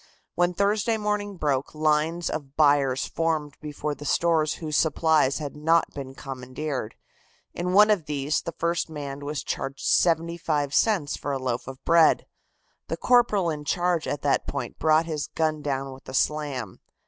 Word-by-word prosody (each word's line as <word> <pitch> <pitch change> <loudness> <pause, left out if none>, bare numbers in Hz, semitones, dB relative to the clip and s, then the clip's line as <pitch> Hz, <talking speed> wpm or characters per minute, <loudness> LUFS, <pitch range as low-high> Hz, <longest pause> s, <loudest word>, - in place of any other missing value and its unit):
When 175 0 +1
Thursday 205 +3 +1
morning 210 -2 -2
broke, 145 -2 -1
lines 155 +2 +1
of 140 -3 -6
buyers 145 -3 +3
formed 155 -3 -1
before 150 0 -4
the 145 - -10
stores 155 0 +2
whose 155 -2 -4
supplies 155 -4 +3
had 150 -2 -5
not 165 +2 +2
been 135 -2 -7
commandeered. 130 -2 -5 0.6
In 180 +1 -2
one 210 +2 +7
of 185 -7 0
these, 145 0 -1
the 170 - -5
first 170 0 -1
man 145 -3 -6
was 145 0 -4
charged 135 0 -4
75 165 -4 +1
cents 185 -9 +2
for 145 - -3
a - - 0
loaf 125 -2 -3
of 135 -1 -10
bread. 165 -1 +5 0.6
The - - -3
corporal 215 -8 +3
in 150 -1 -5
charge 175 +1 0
at 145 - -3
that 145 - +1
point 135 -4 -5
brought 155 +1 +3
his 155 -3 -3
gun 155 -1 -1
down 135 -2 -3
with 130 - -13
a 130 - -5
slam. 140 -9 -1
155 Hz, 165 wpm, -25 LUFS, 140-170 Hz, 0.6 s, one